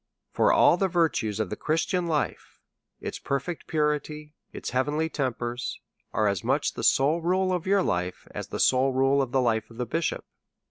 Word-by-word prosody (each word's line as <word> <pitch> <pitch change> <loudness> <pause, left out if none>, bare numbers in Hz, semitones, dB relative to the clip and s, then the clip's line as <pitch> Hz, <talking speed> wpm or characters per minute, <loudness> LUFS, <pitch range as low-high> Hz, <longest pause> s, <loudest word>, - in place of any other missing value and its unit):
For - - +3
all 170 - +5
the 195 - +2
virtues 160 - 0
of 105 -5 -2
the - - -2
Christian 175 +3 0
life, 155 -3 -2 0.4
its - - -5
perfect 140 +5 -3
purity, 150 0 -1 0.2
its - - -6
heavenly 145 +5 0
tempers, 125 -4 -3 0.3
are 110 0 +1
as 100 -3 -1
much - - +1
the - - -6
sole 150 +5 +3
rule 185 +2 +1
of 180 0 -2
your 195 -1 +3
life 90 - -2
as - - -6
the - - -5
sole 130 +1 +3
rule 135 +2 +3
of 130 -3 -2
the 130 - +2
life 110 -2 0
of 115 +1 -14
a 125 - 0
bishop. 160 +8 -2
140 Hz, 185 wpm, -26 LUFS, 120-165 Hz, 0.4 s, all